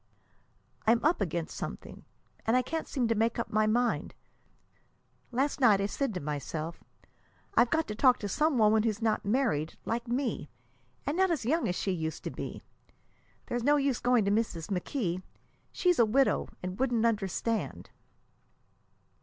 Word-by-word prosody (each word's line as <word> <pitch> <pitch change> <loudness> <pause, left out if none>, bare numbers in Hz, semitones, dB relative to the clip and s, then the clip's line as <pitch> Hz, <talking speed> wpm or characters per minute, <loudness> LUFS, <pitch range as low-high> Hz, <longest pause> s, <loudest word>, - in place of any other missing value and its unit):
"I'm 230 +4 +4
up 315 -5 +3
against 170 -3 -2
something, - - -7 0.4
and 230 +3 +4
I 255 - +2
can't 320 +3 -3
seem 255 -5 0
to 230 - +2
make 225 +1 +1
up 235 - -3
my 215 0 +3
mind. 240 +2 0 1.2
Last 270 +5 0
night 215 -6 +6
I 200 - +1
said 270 +5 -1
to - - -1
myself, 155 +2 -4 0.7
'I've 235 0 +4
got 320 +3 +1
to 210 - -3
talk 250 +3 +4
to 205 - -2
some 300 +7 +1
woman 215 -1 +5
who's 215 -2 -1
not 220 -2 0
married, 205 - 0
like 235 +2 -2
me, 240 - -2 0.6
and 290 - -1
not 380 +1 +3
as 310 -10 -1
young 310 +1 +1
as 180 - -1
she 195 - -1
used 160 -3 -3
to - - -4
be. - - -6 0.8
There's 240 -1 -2
no 290 +3 +5
use 275 -4 +1
going 245 -4 +3
to 200 - +2
Mrs. 205 -5 -1
McKee: 185 -1 -2 0.5
she's 360 -4 +2
a 235 - +7
widow, 265 +5 +2 0.2
and 185 +3 -5
wouldn't 240 -3 +2
understand.'" 220 +1 -1
230 Hz, 165 wpm, -30 LUFS, 200-260 Hz, 1.2 s, a